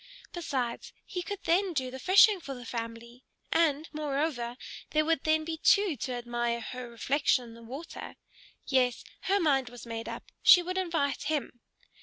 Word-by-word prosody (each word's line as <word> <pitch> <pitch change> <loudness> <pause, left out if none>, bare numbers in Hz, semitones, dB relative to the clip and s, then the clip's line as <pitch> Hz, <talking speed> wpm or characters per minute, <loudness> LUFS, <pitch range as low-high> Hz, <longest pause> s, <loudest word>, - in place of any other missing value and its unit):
Besides, 265 -9 -3
he 360 - -4
could 405 +2 -6
then 365 +2 +2
do 260 -4 -2
the 260 - -7
fishing 395 - +6
for 275 -4 -6
the 245 -1 -10
family; 230 +1 -6 0.3
and, 315 -2 +2
moreover, 280 -5 -2 0.3
there 310 0 +2
would 325 -3 +1
then 315 0 +3
be 325 0 -3
two 400 -3 +4
to 250 +3 -3
admire 240 -1 -2
her 250 +1 -7
reflection 255 +2 +1
in - - -12
the 230 - -13
water. 265 +8 -8 0.5
Yes; 250 -3 +1 0.2
her 395 +1 +3
mind 275 -7 +2
was 245 -1 -11
made 230 -1 -5
up. - - -8
She 360 -2 +8
would 365 +2 -2
invite 320 -7 -1
him. 290 -5 -2
275 Hz, 170 wpm, -29 LUFS, 245-330 Hz, 0.5 s, She